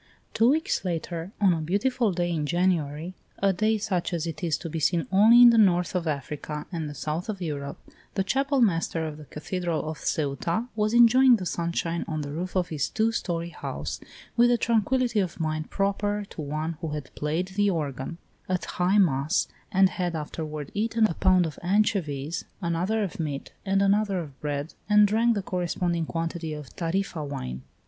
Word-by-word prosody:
V. -, -, -32 dB, 0.3 s
Two 225 Hz, +2 st, +4 dB
weeks 315 Hz, -4 st, +1 dB
later, 170 Hz, 0 st, -3 dB
on 195 Hz, -3 st, +5 dB
a 165 Hz, -, -2 dB
beautiful 210 Hz, +7 st, +1 dB
day 175 Hz, -1 st, -1 dB
in 155 Hz, -3 st, -1 dB
January, 170 Hz, -1 st, 0 dB, 0.2 s
a 195 Hz, -1 st, +2 dB
day 215 Hz, +4 st, +2 dB
such 185 Hz, -4 st, -1 dB
as 165 Hz, -1 st, -2 dB
is 165 Hz, -1 st, -2 dB
to -, -, -7 dB
be 160 Hz, 0 st, -3 dB
seen 165 Hz, 0 st, +1 dB
only 225 Hz, +5 st, +7 dB
in 240 Hz, -, +10 dB
the 230 Hz, -, +4 dB
north 180 Hz, -4 st, +3 dB
of 175 Hz, -3 st, -1 dB
Africa 150 Hz, +1 st, -4 dB
and 160 Hz, -4 st, -3 dB
the 145 Hz, -, -8 dB
south 155 Hz, +7 st, -3 dB
of 205 Hz, -3 st, -3 dB
Europe, 145 Hz, -5 st, -4 dB, 0.4 s
the 195 Hz, -, +1 dB
Chapel 275 Hz, +5 st, +1 dB
master 165 Hz, -5 st, +1 dB
of 155 Hz, -1 st, -5 dB
the 155 Hz, -, -11 dB
cathedral 170 Hz, +1 st, -3 dB
of 155 Hz, 0 st, -5 dB
Ceuta 160 Hz, -, -1 dB
was 215 Hz, +1 st, +1 dB
enjoying 245 Hz, +2 st, +7 dB
the 190 Hz, -5 st, -4 dB
sunshine 170 Hz, 0 st, -1 dB
on 155 Hz, -1 st, -2 dB
the 145 Hz, -1 st, -5 dB
roof 180 Hz, +5 st, -4 dB
of 180 Hz, -2 st, +1 dB
his 150 Hz, -2 st, -1 dB
two 220 Hz, +1 st, +1 dB
story 170 Hz, -6 st, -2 dB
house, -, -, -5 dB, 0.4 s
with 240 Hz, 0 st, +5 dB
the 240 Hz, -, +4 dB
tranquillity 235 Hz, +1 st, +1 dB
of 185 Hz, -3 st, -2 dB
mind 155 Hz, -1 st, -2 dB
proper 205 Hz, +1 st, -1 dB
to -, -, -6 dB
one 155 Hz, +2 st, -3 dB
who 165 Hz, -, -3 dB
had 150 Hz, -3 st, -6 dB
played 160 Hz, +5 st, -2 dB
the 205 Hz, +1 st, +1 dB
organ 150 Hz, -3 st, -3 dB, 0.3 s
at 185 Hz, -1 st, -1 dB
high 180 Hz, +3 st, +1 dB
mass 155 Hz, -3 st, +2 dB, 0.2 s
and 190 Hz, -1 st, +5 dB
had 175 Hz, -2 st, -2 dB
afterward 150 Hz, -1 st, -5 dB
eaten 225 Hz, +1 st, +2 dB
a 175 Hz, -, +1 dB
pound 185 Hz, +1 st, +3 dB
of 155 Hz, -, -6 dB
anchovies, 175 Hz, -5 st, 0 dB, 0.2 s
another 180 Hz, +5 st, 0 dB
of 190 Hz, -, -5 dB
meat, 145 Hz, -4 st, -4 dB, 0.2 s
and 195 Hz, +1 st, +3 dB
another 200 Hz, 0 st, +2 dB
of 150 Hz, -6 st, -7 dB
bread, 145 Hz, +1 st, -3 dB, 0.2 s
and 210 Hz, 0 st, +6 dB
drank 230 Hz, +3 st, +2 dB
the 200 Hz, -, -2 dB
corresponding 175 Hz, -2 st, -1 dB
quantity 165 Hz, -1 st, -3 dB
of 150 Hz, -4 st, -9 dB
Tarifa 175 Hz, -1 st, -2 dB
wine. 65 Hz, -, -5 dB
175 Hz, 190 wpm, -26 LUFS, 155-205 Hz, 0.4 s, in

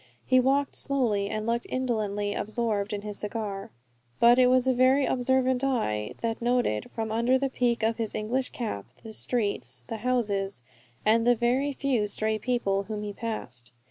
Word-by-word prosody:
He 255 Hz, 0 st, +5 dB
walked 275 Hz, +2 st, +2 dB
slowly, 225 Hz, -8 st, 0 dB
and 215 Hz, 0 st, -3 dB
looked 235 Hz, +1 st, -1 dB
indolently 210 Hz, -5 st, -1 dB
absorbed 215 Hz, -2 st, -1 dB
in 205 Hz, -1 st, -3 dB
his 210 Hz, -1 st, -6 dB
cigar. 205 Hz, -2 st, -4 dB, 0.5 s
But 240 Hz, +2 st, +6 dB
it 250 Hz, -, +6 dB
was 255 Hz, 0 st, +4 dB
a 260 Hz, -, +3 dB
very 260 Hz, +2 st, +4 dB
observant 260 Hz, 0 st, +1 dB
eye 105 Hz, -, -1 dB
that 230 Hz, 0 st, -2 dB
noted, 240 Hz, -, +1 dB
from 220 Hz, -1 st, -4 dB
under 235 Hz, +4 st, +3 dB
the 270 Hz, +1 st, -1 dB
peak 240 Hz, -3 st, 0 dB
of 225 Hz, +1 st, +1 dB
his 225 Hz, -2 st, -3 dB
English 245 Hz, +5 st, -1 dB
cap, 215 Hz, -, -4 dB, 0.2 s
the 220 Hz, -, -8 dB
streets, 200 Hz, -, -1 dB
the 225 Hz, -, -4 dB
houses, 205 Hz, -, -1 dB, 0.4 s
and 225 Hz, +2 st, +4 dB
the 245 Hz, -, +6 dB
very 250 Hz, +5 st, +1 dB
few 260 Hz, -6 st, 0 dB
stray 215 Hz, +1 st, -1 dB
people 200 Hz, -6 st, 0 dB
whom 210 Hz, 0 st, -4 dB
he 205 Hz, -1 st, -4 dB
passed. 125 Hz, -, -5 dB
230 Hz, 175 wpm, -27 LUFS, 210-250 Hz, 0.5 s, But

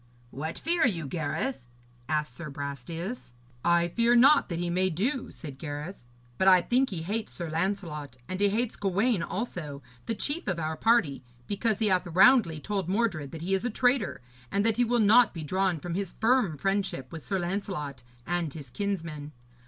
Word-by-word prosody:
'What 155 Hz, +4 st, -4 dB
fear 335 Hz, +1 st, +1 dB
you, 170 Hz, -9 st, -2 dB
Gareth?' 155 Hz, -, -3 dB, 0.4 s
asked 150 Hz, -3 st, 0 dB
Sir 155 Hz, +4 st, -7 dB
Brastias. 145 Hz, -, -6 dB, 0.3 s
'I 170 Hz, 0 st, +3 dB
fear 235 Hz, +5 st, +3 dB
naught 270 Hz, +3 st, +6 dB
that 170 Hz, -, -2 dB
he 175 Hz, +1 st, -2 dB
may 185 Hz, +2 st, +2 dB
do,' 230 Hz, -, -1 dB
said 140 Hz, -5 st, -9 dB
Gareth, 150 Hz, -1 st, -6 dB, 0.3 s
'but 190 Hz, -, +3 dB
I 185 Hz, -1 st, +8 dB
think 255 Hz, +8 st, +2 dB
he 170 Hz, -5 st, -4 dB
hates 210 Hz, +5 st, -3 dB
Sir 170 Hz, -3 st, -5 dB
Lancelot 160 Hz, -, -3 dB
and 185 Hz, -, -4 dB
he 205 Hz, 0 st, +4 dB
hates 225 Hz, +3 st, -1 dB
Gawaine 200 Hz, +2 st, +1 dB
also, 170 Hz, -8 st, -4 dB, 0.2 s
the 225 Hz, -, -1 dB
chief 290 Hz, +9 st, -2 dB
of 190 Hz, -4 st, 0 dB
our 160 Hz, -1 st, -2 dB
party, 180 Hz, -, +2 dB, 0.2 s
because 205 Hz, -, 0 dB
he 220 Hz, -2 st, +1 dB
hath 185 Hz, -2 st, +2 dB
roundly 185 Hz, -, +5 dB
told 195 Hz, +1 st, -3 dB
Mordred 190 Hz, -9 st, 0 dB
that 160 Hz, +3 st, -8 dB
he 190 Hz, +3 st, -1 dB
is 190 Hz, -, +1 dB
a 245 Hz, -, 0 dB
traitor, 245 Hz, -, +1 dB, 0.3 s
and 200 Hz, +1 st, +1 dB
that 225 Hz, -1 st, +3 dB
he 245 Hz, -, +4 dB
will 240 Hz, +1 st, +1 dB
not 230 Hz, 0 st, +5 dB
be 165 Hz, -, -5 dB
drawn 185 Hz, +1 st, 0 dB
from 175 Hz, +2 st, -5 dB
his 195 Hz, 0 st, -2 dB
firm 225 Hz, -, +3 dB
friendship 195 Hz, -8 st, -1 dB
with 160 Hz, -2 st, -7 dB
Sir 195 Hz, -, -1 dB
Lancelot 175 Hz, -6 st, -3 dB, 0.2 s
and 175 Hz, -4 st, -2 dB
his 140 Hz, -6 st, -9 dB
kinsmen. 165 Hz, -7 st, -4 dB
185 Hz, 185 wpm, -28 LUFS, 155-215 Hz, 0.4 s, I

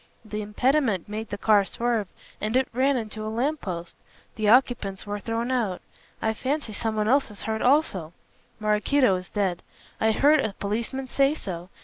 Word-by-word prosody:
The 215 Hz, 0 st, -4 dB
impediment 220 Hz, -, +1 dB
made 215 Hz, +1 st, -5 dB
the 205 Hz, -, -4 dB
car 205 Hz, 0 st, +4 dB
swerve 230 Hz, 0 st, -1 dB, 0.3 s
and 215 Hz, +3 st, -1 dB
it 260 Hz, -, +2 dB
ran 265 Hz, +2 st, +2 dB
into 220 Hz, -2 st, -5 dB
a 215 Hz, -, -3 dB
lamp 270 Hz, +8 st, -1 dB
post. 170 Hz, -3 st, -5 dB, 0.4 s
The 215 Hz, -2 st, 0 dB
occupants 230 Hz, -5 st, +3 dB
were 205 Hz, 0 st, -3 dB
thrown 230 Hz, +3 st, -2 dB
out. 220 Hz, -8 st, 0 dB, 0.4 s
I 220 Hz, -, +2 dB
fancy 265 Hz, 0 st, -2 dB
someone 215 Hz, 0 st, -1 dB
else 270 Hz, +3 st, +3 dB
is 210 Hz, -, -8 dB
hurt 220 Hz, 0 st, -2 dB
also. 245 Hz, -, +2 dB, 0.5 s
Maraquito 215 Hz, +2 st, +3 dB
is 180 Hz, 0 st, -8 dB
dead. 190 Hz, -4 st, -1 dB, 0.4 s
I 220 Hz, -, +3 dB
heard 295 Hz, +7 st, +5 dB
a 220 Hz, -7 st, -1 dB
policeman 230 Hz, +7 st, -3 dB
say 275 Hz, +3 st, +2 dB
so. 180 Hz, -, -6 dB
220 Hz, 170 wpm, -26 LUFS, 205-255 Hz, 0.5 s, heard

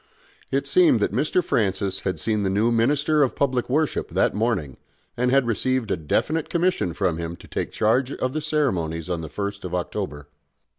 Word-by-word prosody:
It -, -, 0 dB
seemed 345 Hz, -7 st, +5 dB
that -, -, 0 dB
Mr. 175 Hz, +4 st, +1 dB
Francis 100 Hz, -, 0 dB
had 95 Hz, -, -3 dB
seen 110 Hz, -2 st, 0 dB
the 100 Hz, -, 0 dB
new 105 Hz, +5 st, +2 dB
Minister 145 Hz, +6 st, +2 dB
of 135 Hz, -, +2 dB
Public 130 Hz, -4 st, 0 dB
Worship 150 Hz, +3 st, 0 dB
that -, -, +1 dB
morning, 105 Hz, -, -1 dB, 0.4 s
and 125 Hz, +1 st, +1 dB
had 135 Hz, 0 st, +3 dB
received 120 Hz, 0 st, 0 dB
a -, -, +3 dB
definite 150 Hz, -, -1 dB
commission 175 Hz, -, +1 dB
from 90 Hz, -6 st, 0 dB
him 85 Hz, 0 st, -4 dB
to -, -, -15 dB
take -, -, -3 dB
charge 125 Hz, +5 st, +1 dB
of 130 Hz, 0 st, -2 dB
the 155 Hz, -, -2 dB
ceremonies 90 Hz, -, -1 dB
on 85 Hz, -2 st, -2 dB
the 80 Hz, -, -7 dB
first 100 Hz, +5 st, -4 dB
of 90 Hz, -1 st, -3 dB
October. 85 Hz, -5 st, -4 dB
115 Hz, 190 wpm, -24 LUFS, 90-140 Hz, 0.4 s, seemed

